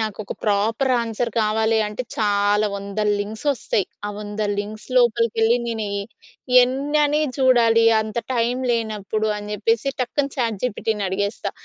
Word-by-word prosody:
నాకు 215 -2 -3
ఒక - - -6
proper 220 +5 +1
answer 230 +1 -2
కావాలి 220 +1 +2
అంటే, 210 +4 -4
చాలా 205 0 +2
100ల 200 +1 -2
లింక్స్ 215 +4 -6
ఒస్తయి. 210 -5 -1 0.2
ఆ - - -3
100 210 0 -6 0.2
లింక్స్ 210 +2 -6
లోపలికెళ్లి 230 -1 +3
నేను 225 -2 -3
ఎ - - -5 0.6
ఎన్నని 290 +3 +1 0.2
చూడాలి. 235 -3 +4 0.2
అంత 220 +1 -4 0.2
టైమ్ 240 +2 0
లేనప్పుడు 215 -2 -1
అని 210 0 -8
చెప్పేసి, 230 +5 0
టక్కున 275 +3 -1
చాట్ 230 -6 -1
జీపీటీని 220 -3 -1
అడిగేస్తా. 200 +3 -2
220 Hz, 140 wpm, -22 LUFS, 210-235 Hz, 0.6 s, చూడాలి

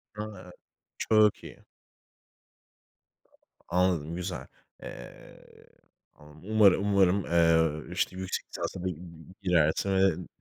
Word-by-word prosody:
A, 105 -4 -8 0.5
Çok 110 -1 +3
iyi. - - -12 2.0
Anladım, 85 -3 0
güzel. 90 +1 -5 0.4
Eee, 60 - -11 1.0
umarım, 105 -1 +3
umarım, 95 0 +3
eee, 80 -2 +2
işte - - -1
yüksek 95 0 -4
lisansa 90 - -5
da - - -1 0.5
girersin 90 -1 +2
ve 95 -3 +1
90 Hz, 85 wpm, -28 LUFS, 85-100 Hz, 2.0 s, Çok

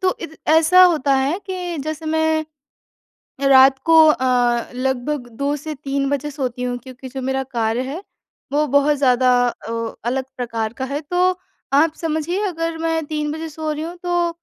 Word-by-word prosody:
तो 370 - +1
इत 325 -2 -8
ऐसा 325 +4 +6
होता 300 -6 +4
है 280 +7 0
कि 360 -2 -4
जैसे 310 +1 -5
मैं 315 0 +1 1.0
रात 265 0 +7
को 325 0 +5
अ, 245 -4 +2
लगभग 260 +1 -2
2 285 +1 0
से 305 +2 -6
3 275 0 -2
बजे 285 +1 -2
सोती 255 -3 -4
हूँ 245 0 -2
क्योंकि 260 0 -11
जो 265 +1 -6
मेरा 265 +1 -1
कार्य 235 -2 -1
है 290 +9 -6 0.5
वो 300 +1 +2
बहुत 285 +2 +3
ज़्यादा 255 -2 +3 0.4
ओ, 230 0 -2 0.2
अलग 260 +2 -1
प्रकार 230 -3 -3
का 260 +2 -5
है। 280 +2 -3
तो 360 +4 +1 0.4
आप 305 +3 +4
समझिए 325 +4 -1
अगर 330 -2 -3
मैं 325 -1 -1
3 300 -1 -2
बजे 320 +1 -5
सो 310 0 -4
रही 300 +1 -4
हूँ 345 +2 -7
तो 350 -1 +1
290 Hz, 175 wpm, -20 LUFS, 260-320 Hz, 1.0 s, रात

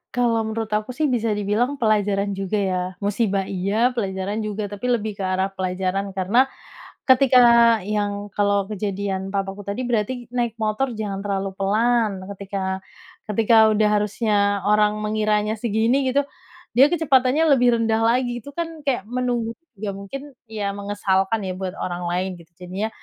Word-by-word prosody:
Kalau 235 -2 +2
menurut 220 0 -3
aku 215 +4 -2
sih 300 +4 0
bisa 230 -3 0
dibilang 210 +7 0
pelajaran 205 -3 +1
juga 195 +2 -2
ya. 185 -2 0 0.2
Musibah 200 -1 0
iya, 210 +7 0
pelajaran 200 0 -2
juga 210 0 -3
tapi 205 +5 -3
lebih 215 -3 -1
ke 195 - -5
arah 185 +1 0
pelajaran 190 +1 -2
karena 210 +8 +2 0.5
ketika 260 -1 +5 0.5
yang 205 -1 -2
kalau 200 -1 +1
kejadian 195 -1 -3
papaku 195 0 -3
tadi 205 +6 -4
berarti 240 +1 -1
naik 235 -2 -1
motor 220 +5 0
jangan 200 -2 -3
terlalu 195 -1 -2
pelan. 210 0 +1
Ketika 195 -1 -4 0.5
ketika 225 +2 +3
udah 215 0 +3
harusnya 210 +1 -1 0.3
orang 210 0 +3
mengiranya 215 0 0
segini 235 +4 +1
gitu, 280 +2 +1 0.5
dia 270 +5 +6
kecepatannya 295 -2 +3
lebih 245 -2 +4
rendah 225 0 +1
lagi, 240 +1 +1
itu 285 - -10
kan 330 +1 -5
kayak 250 -8 0
menunggu, 245 -2 -1 0.3
ya 205 -1 -3
mungkin 270 +9 -8 0.2
ya 205 -2 -3
mengesalkan 200 +1 0
ya 185 - -2
buat 190 -1 -3
orang 175 0 -3
lain 185 +2 -1
gitu, 170 0 -17
jadinya 185 +4 -3
210 Hz, 150 wpm, -22 LUFS, 195-240 Hz, 0.5 s, dia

